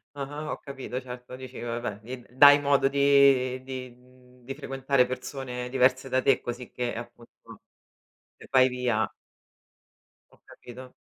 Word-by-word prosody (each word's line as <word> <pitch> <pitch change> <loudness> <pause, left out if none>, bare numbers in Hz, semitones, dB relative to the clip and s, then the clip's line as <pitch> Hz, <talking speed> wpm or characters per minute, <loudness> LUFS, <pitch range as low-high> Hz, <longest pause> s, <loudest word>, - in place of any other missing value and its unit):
Ah-ah 145 +2 -6
ho - - -4
capito, 135 -2 -6
certo. 125 0 -9
Dici, 130 0 -9
vabbè, 120 -3 -4
di 125 +2 -9
dai 145 +3 +8
modo 140 -1 +3
di 140 -2 +4
di 130 -2 -7 0.5
di 135 +3 -7
frequentare 135 -1 0
persone 125 -1 -6
diverse 130 +1 +2
da 130 0 +1
te 130 0 +3
così 120 0 -6
che 120 -1 -3
appunto 120 0 -10 1.1
se - - -14
vai 130 -1 +6
via 125 -4 -1 1.2
Ho - - -25
capito. 125 +1 -12
130 Hz, 135 wpm, -27 LUFS, 125-135 Hz, 1.2 s, dai